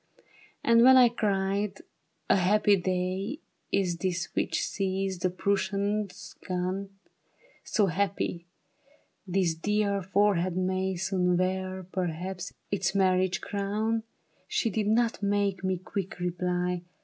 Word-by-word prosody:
And 230 0 +5
when 260 +2 +8
I 250 -2 +7
cried, 200 -2 0
^' - - -13 0.5
A - - +4
happy 205 +2 +4
day 185 +6 -2 0.3
Is 180 -3 +1
this 175 -1 -2
which 160 - 0
sees 190 -1 -2
the 185 - +1
Prussians 200 +2 -1
gone, 185 +2 -2 0.7
So 210 - +2
happy, 185 -2 -1 0.8
this 180 -2 +1
dear 200 +3 0
forehead 185 -2 +1
may 185 +1 0
Soon 180 0 +1
wear, 185 +1 -1
perhaps, 180 +1 -3 0.2
its 200 0 0
marriage 185 -1 +2
crown, 210 +3 -1 0.5
She 225 - 0
did 210 0 -1
not 230 +1 +2
make 200 -2 0
me 185 -1 0
quick 185 +1 -5
reply. 180 0 -1
190 Hz, 120 wpm, -28 LUFS, 180-200 Hz, 0.8 s, when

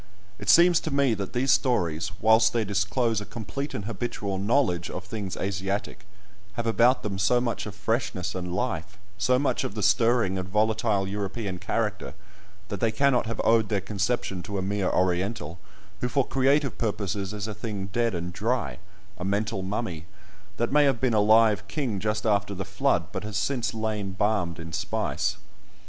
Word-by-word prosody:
It 105 -2 -4
seems 175 0 +7
to 160 - -4
me 140 -3 +3
that 100 -3 -4
these 130 +2 +2
stories, 85 - +1
whilst 110 +1 +5
they 115 -2 +1
disclose 105 +3 0
a - - -4
complete 120 +7 -5
and 100 - -4
habitual 100 -3 -3
knowledge 100 -6 +1
of 90 - -5
things 100 -1 -5
Asiatic, 100 +1 -3 0.5
have 115 +3 -3
about 120 +3 +3
them 100 -3 -3
so 110 +6 +3
much 120 -3 -2
of 105 - -7
freshness 105 -3 -1
and 90 -1 -4
life, 95 -3 -3 0.2
so 125 +6 +3
much 140 +2 0
of 100 - -4
the 105 - -2
stirring 105 -2 +3
and 90 0 -5
volatile 105 -1 +1
European 100 -1 -4
character, 105 +1 -2 0.5
that 100 - -4
they 115 +1 +2
cannot 125 +1 +2
have 115 - -4
owed 110 -2 +3
their 105 - +1
conception 100 0 -2
to 100 +2 -5
a 95 - -1
mere 100 -1 0
Oriental, 90 -2 -1 0.4
who 125 - 0
for 135 0 +2
creative 135 -2 +2
purposes 100 -3 -2
is 105 0 -4
a 110 - -4
thing 105 -2 -5
dead 115 -4 +1
and 85 +1 -4
dry—a 95 - -4
mental 100 +1 -1
mummy, 95 -4 -4 0.5
that 120 +1 0
may 145 +1 +5
have 135 -4 +2
been 125 -2 +1
a 110 - +4
live 110 -1 +4
king 110 -1 -2
just 105 +2 -1
after 100 -2 +1
the 95 0 -4
Flood, 95 +1 0
but - - -4
has 105 -1 -3
since 115 0 0
lain 110 -3 -3
balmed 95 -4 0
in 85 0 -8
spice. - - -1
105 Hz, 180 wpm, -26 LUFS, 95-115 Hz, 0.5 s, seems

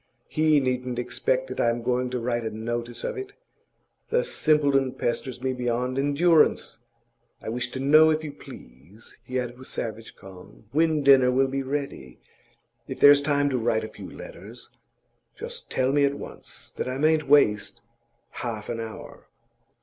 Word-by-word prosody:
He 155 -1 +3
needn't 125 -2 -2
expect - - -1
that - - -6
I'm 115 0 +1
going 125 +1 0
to 125 - -3
write 120 0 -2
a 110 - -2
notice 120 +2 -5
of - - -3
it. 395 +1 -8 0.7
The 485 +1 +1
simpleton 140 - +2
pesters 125 0 -3
me 130 0 0
beyond 125 +1 -2
endurance. 145 -3 +2 0.6
I - - -7
wish 120 +2 -3
to 130 - -6
know, 155 +4 +6
if 155 0 0
you 150 - -5
please,' 85 - -15
he 125 +2 -3
added 125 0 -5
with 130 - -10
savage 115 0 -6
calm, 90 -11 -14
'when 155 0 +2
dinner 135 -2 +6
will 135 +1 +2
be 135 +1 -2
ready. 135 - -5 0.7
If - - -7
there's 145 0 +8
time 145 0 +1
to 130 - 0
write 110 -1 0
a 110 - -6
few - - -10
letters, - - -11 0.6
just - - -8
tell 130 +1 0
me 145 0 +3
at 140 0 +2
once, - - -11
that - - -2
I 130 - -3
mayn't 155 +1 +2
waste 105 -8 +3 0.5
half 110 -3 -5
an 115 - -3
hour. 110 -1 -9
130 Hz, 165 wpm, -25 LUFS, 120-145 Hz, 0.7 s, there's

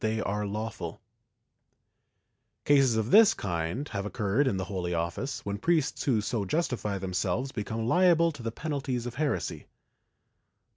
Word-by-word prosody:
V] 110 0 +1
ITALIAN 105 -1 -2
MYSTICS 110 +2 -4 2.0
43 110 - +3
have 100 -1 -2
occurred 105 +5 0
in 100 - +1
the 95 - -2
Holy 90 -3 -3
Office, 85 +11 -3
when 100 0 -3
priests 165 +1 +1
who 120 -6 +2
so 110 0 -1
justify 110 - -1
themselves 95 +7 -2
become 110 0 -3
liable 170 +1 +4
to 145 -5 -10
the 115 -1 -3
penalties 135 -3 -3
of 120 - -4
heresy. 150 -2 -2
110 Hz, 130 wpm, -28 LUFS, 100-140 Hz, 2.0 s, liable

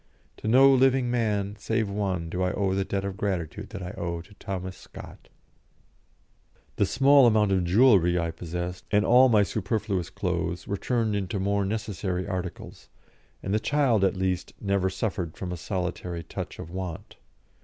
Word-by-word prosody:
To - - -6
no 130 +5 +7
living 130 -1 +3
man 105 -4 -1
save 110 -1 -1
one 95 -4 -2
do 90 +2 -3
I 90 0 +1
owe 95 -2 0
the 95 0 0
debt 100 0 -3
of 100 -1 -4
gratitude 95 0 -3
that 100 -4 -7
I 90 - -5
owe 85 -3 -4
to 95 +5 -17
Thomas 95 -2 -5
Scott." - - -13 1.5
The 100 - +2
small 135 +2 +5
amount 105 -3 +3
of 95 -2 +2
jewellery 90 -3 +5
I 85 -1 -1
possessed, 90 +2 -5
and 105 0 +3
all 130 +2 +6
my 105 -3 +5
superfluous 100 -3 -2
clothes, 90 -1 -3
were 100 - -1
turned 115 0 0
into 100 0 -2
more 100 +1 0
necessary 95 -3 -3
articles, 95 -2 -6 0.5
and 95 - -2
the 105 - +3
child, 130 -5 +2
at 95 0 +2
least, 95 -1 -2
never 100 -2 0
suffered 95 -4 -3
a 90 -1 -4
solitary 90 -1 -4
touch 80 - -7
of 85 - -8
want. 90 -2 -6
95 Hz, 165 wpm, -26 LUFS, 90-110 Hz, 1.5 s, no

